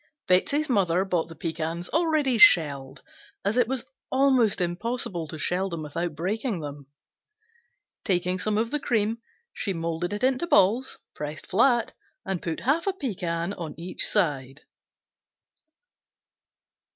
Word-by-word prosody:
Betsey's 280 Hz, +12 st, +2 dB
mother 190 Hz, -6 st, +2 dB
bought 175 Hz, -4 st, 0 dB
the 165 Hz, -, -10 dB
pecans 165 Hz, +1 st, -3 dB
already 310 Hz, -7 st, +1 dB
shelled, 140 Hz, -9 st, +5 dB, 0.4 s
as 205 Hz, +3 st, +1 dB
it 245 Hz, -2 st, +3 dB
was 260 Hz, -1 st, -3 dB, 0.3 s
almost 260 Hz, -5 st, +3 dB
impossible 175 Hz, -1 st, -2 dB
to 160 Hz, -, -7 dB
shell 185 Hz, +4 st, 0 dB
them 165 Hz, -3 st, -5 dB
without 165 Hz, +2 st, -3 dB
breaking 200 Hz, -, -2 dB
them. 145 Hz, -2 st, -8 dB, 1.2 s
Taking 180 Hz, -2 st, 0 dB
some 210 Hz, +2 st, 0 dB
of 225 Hz, +2 st, 0 dB
the 295 Hz, -, 0 dB
cream, 225 Hz, -3 st, 0 dB, 0.3 s
she 195 Hz, -, -2 dB
molded 165 Hz, +1 st, -3 dB
it 205 Hz, +3 st, -4 dB
into 260 Hz, +6 st, +2 dB
balls, 230 Hz, -, +3 dB, 0.2 s
pressed 150 Hz, +1 st, -6 dB
flat 240 Hz, +4 st, +2 dB, 0.3 s
and 190 Hz, -3 st, -2 dB
put 165 Hz, -2 st, -4 dB
half 305 Hz, +9 st, +1 dB
a 390 Hz, -, +2 dB
pecan 185 Hz, -, -3 dB
on 165 Hz, -6 st, -7 dB
each 175 Hz, +2 st, -3 dB
side. 140 Hz, -8 st, 0 dB
190 Hz, 135 wpm, -26 LUFS, 165-240 Hz, 1.2 s, shelled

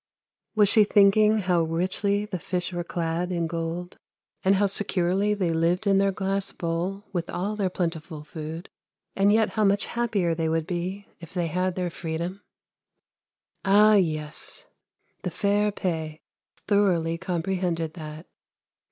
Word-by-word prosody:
Was 210 Hz, -1 st, +5 dB
she 215 Hz, +2 st, +6 dB
thinking 210 Hz, +1 st, +5 dB
how 180 Hz, -4 st, +2 dB
richly 185 Hz, +5 st, 0 dB
the 190 Hz, -4 st, -5 dB
fish 180 Hz, +1 st, -3 dB
were 175 Hz, 0 st, -2 dB
clad 170 Hz, +1 st, -2 dB
in 170 Hz, -2 st, 0 dB
gold, 165 Hz, +2 st, -4 dB, 0.4 s
and 195 Hz, +1 st, +4 dB
how 205 Hz, +1 st, +3 dB
securely 200 Hz, 0 st, +1 dB
they 180 Hz, -5 st, 0 dB
lived 170 Hz, +5 st, +1 dB
in 195 Hz, -1 st, +4 dB
their 195 Hz, 0 st, +3 dB
glass 195 Hz, 0 st, -1 dB
bowl 175 Hz, +4 st, -3 dB
with 175 Hz, -2 st, -2 dB
all 200 Hz, +4 st, -2 dB
their 200 Hz, -3 st, 0 dB
plentiful 165 Hz, -4 st, -4 dB
food, 160 Hz, +3 st, -7 dB, 0.5 s
and 200 Hz, +1 st, +4 dB
yet 220 Hz, 0 st, +3 dB
how 215 Hz, -, 0 dB
much 200 Hz, 0 st, +3 dB
happier 215 Hz, -8 st, 0 dB
they 160 Hz, -1 st, -1 dB
would 160 Hz, 0 st, 0 dB
be 185 Hz, +3 st, -4 dB
if 170 Hz, +1 st, -12 dB
they 175 Hz, -1 st, 0 dB
had 180 Hz, +2 st, -1 dB
their 180 Hz, -2 st, -2 dB
freedom? 170 Hz, +4 st, -4 dB, 1.2 s
Ah, 210 Hz, +2 st, +6 dB
yes, 160 Hz, -, 0 dB, 0.6 s
the 180 Hz, -, -2 dB
fair 205 Hz, +4 st, +1 dB
Pe 160 Hz, -6 st, -3 dB, 0.5 s
thoroughly 175 Hz, -5 st, +2 dB
comprehended 175 Hz, -2 st, -2 dB
that. 155 Hz, 0 st, -8 dB
180 Hz, 145 wpm, -26 LUFS, 165-200 Hz, 1.2 s, she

